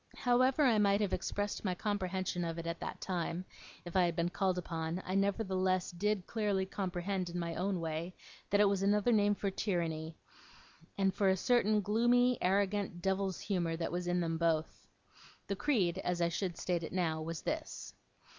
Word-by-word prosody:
However 255 Hz, +3 st, +3 dB
I 235 Hz, -6 st, +4 dB
might 200 Hz, -1 st, +4 dB
have 200 Hz, -3 st, 0 dB
expressed 205 Hz, 0 st, -2 dB
my 185 Hz, -3 st, 0 dB
comprehension 185 Hz, -3 st, -2 dB
of 165 Hz, -1 st, -3 dB
it 165 Hz, -, -5 dB
at 170 Hz, 0 st, -3 dB
that -, -, -5 dB
time, 180 Hz, -1 st, -3 dB, 0.4 s
if 175 Hz, -, -8 dB
I 185 Hz, -1 st, +5 dB
had 170 Hz, -1 st, -1 dB
been 170 Hz, +1 st, +1 dB
called 185 Hz, 0 st, 0 dB
upon, 165 Hz, -1 st, -3 dB
I 185 Hz, -, -3 dB
nevertheless 190 Hz, -2 st, +1 dB
did 195 Hz, +1 st, -1 dB
clearly 205 Hz, -4 st, 0 dB
comprehend 190 Hz, -1 st, -2 dB
in 175 Hz, -, -5 dB
my 170 Hz, -1 st, -2 dB
own 185 Hz, +2 st, -1 dB
way, 165 Hz, +2 st, -4 dB, 0.3 s
that 205 Hz, -, +3 dB
it 205 Hz, -, +6 dB
was 195 Hz, -1 st, +1 dB
another 205 Hz, +3 st, +3 dB
name 205 Hz, -2 st, +4 dB
for 200 Hz, -1 st, -2 dB
tyranny; 165 Hz, -5 st, -2 dB, 0.8 s
and 195 Hz, -1 st, +2 dB
for 195 Hz, 0 st, +2 dB
a 190 Hz, -, +3 dB
certain 215 Hz, -1 st, +3 dB
gloomy, 240 Hz, +4 st, +3 dB
arrogant, 195 Hz, -1 st, +1 dB
devil's 190 Hz, -1 st, 0 dB
humour, 175 Hz, -5 st, -1 dB
that 165 Hz, -, -2 dB
was 175 Hz, +1 st, -3 dB
in 175 Hz, 0 st, +1 dB
them 165 Hz, -1 st, -1 dB
both. 165 Hz, -2 st, 0 dB, 0.6 s
The 200 Hz, -, -2 dB
creed, 195 Hz, -, +1 dB
as 180 Hz, -1 st, -1 dB
I 170 Hz, -1 st, +2 dB
should 175 Hz, 0 st, -3 dB
state 175 Hz, -2 st, -1 dB
it 165 Hz, -, -6 dB
now, 165 Hz, -4 st, 0 dB
was 165 Hz, 0 st, -5 dB
this. -, -, -4 dB
185 Hz, 185 wpm, -33 LUFS, 170-205 Hz, 0.8 s, it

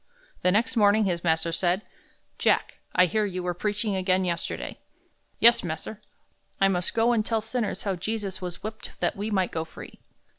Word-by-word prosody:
The 180 Hz, -, +3 dB
next 230 Hz, +7 st, +1 dB
morning 215 Hz, 0 st, +5 dB
his 175 Hz, -3 st, -1 dB
master 165 Hz, 0 st, +1 dB
said, 175 Hz, +4 st, 0 dB, 0.6 s
"Jack, -, -, +1 dB, 0.2 s
I 180 Hz, -, +7 dB
hear 215 Hz, +5 st, +1 dB
you 185 Hz, -3 st, -3 dB
were 180 Hz, 0 st, -1 dB
preaching 210 Hz, +3 st, -1 dB
again 185 Hz, 0 st, +2 dB
yesterday." 170 Hz, -2 st, -3 dB, 0.6 s
"Yes, 235 Hz, +1 st, +6 dB
mas'r. 175 Hz, +5 st, -5 dB, 0.6 s
I 195 Hz, -, +5 dB
must 180 Hz, -2 st, -1 dB
go 230 Hz, +1 st, +4 dB
and 225 Hz, -3 st, +2 dB
tell 225 Hz, 0 st, +1 dB
sinners 225 Hz, 0 st, -2 dB
how 195 Hz, -2 st, -1 dB
Jesus 200 Hz, 0 st, -3 dB
was 180 Hz, -1 st, -6 dB
whipped 215 Hz, +1 st, -7 dB
that -, -, 0 dB
we 205 Hz, +2 st, -3 dB
might 190 Hz, -4 st, +1 dB
go 160 Hz, -, -2 dB
free." 160 Hz, -, -12 dB
195 Hz, 180 wpm, -26 LUFS, 180-215 Hz, 0.6 s, I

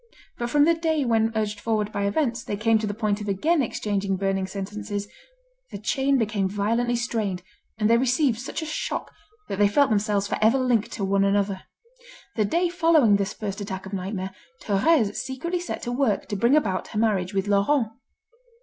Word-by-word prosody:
But 240 Hz, 0 st, -2 dB
from 290 Hz, +3 st, +4 dB
the 335 Hz, -, +5 dB
day 320 Hz, -3 st, 0 dB
when 225 Hz, -1 st, +2 dB
urged 210 Hz, -1 st, -1 dB
forward 215 Hz, -1 st, -1 dB
by 200 Hz, -1 st, -1 dB
events, 235 Hz, +1 st, 0 dB
they 205 Hz, -, -4 dB
came 225 Hz, +1 st, +3 dB
to 215 Hz, -, -2 dB
the 205 Hz, -, -2 dB
point 210 Hz, -1 st, -1 dB
of 210 Hz, -, -4 dB
again 300 Hz, -, +2 dB
exchanging 200 Hz, -5 st, -1 dB
burning 195 Hz, 0 st, -1 dB
sentences, 205 Hz, +1 st, -5 dB, 0.6 s
the -, -, -6 dB
chain 270 Hz, +6 st, +1 dB
became 210 Hz, -5 st, 0 dB
violently 230 Hz, +5 st, 0 dB
strained, 220 Hz, -6 st, -2 dB, 0.3 s
and 210 Hz, -1 st, +2 dB
they 230 Hz, +1 st, +4 dB
received 260 Hz, -1 st, +2 dB
such 270 Hz, +5 st, -5 dB
a -, -, -4 dB
shock, 310 Hz, -, -4 dB, 0.3 s
that 195 Hz, -, -4 dB
they 205 Hz, -, +6 dB
felt 270 Hz, +5 st, +3 dB
themselves 205 Hz, -1 st, +1 dB
for -, -, -2 dB
ever 225 Hz, +5 st, +5 dB
linked 245 Hz, -4 st, +1 dB
to 200 Hz, -, -2 dB
one 195 Hz, 0 st, +2 dB
another. 200 Hz, -1 st, 0 dB, 0.7 s
The 215 Hz, -, +2 dB
day 340 Hz, -, +1 dB
following 325 Hz, -, +4 dB
this 200 Hz, 0 st, -2 dB
first 205 Hz, -1 st, -5 dB
attack 190 Hz, -1 st, -5 dB
of 195 Hz, -, -9 dB
nightmare, 190 Hz, 0 st, -3 dB, 0.3 s
Thérèse 205 Hz, +1 st, +2 dB
secretly 340 Hz, +7 st, -3 dB
set 350 Hz, -, -5 dB
to 240 Hz, -, -3 dB
work 245 Hz, -4 st, +1 dB
to 205 Hz, -, -2 dB
bring 235 Hz, +7 st, +3 dB
about 195 Hz, -11 st, 0 dB
her -, -, -7 dB
marriage 200 Hz, -4 st, 0 dB
with 195 Hz, +1 st, 0 dB
Laurent. 210 Hz, +5 st, +2 dB
215 Hz, 195 wpm, -25 LUFS, 200-250 Hz, 0.7 s, they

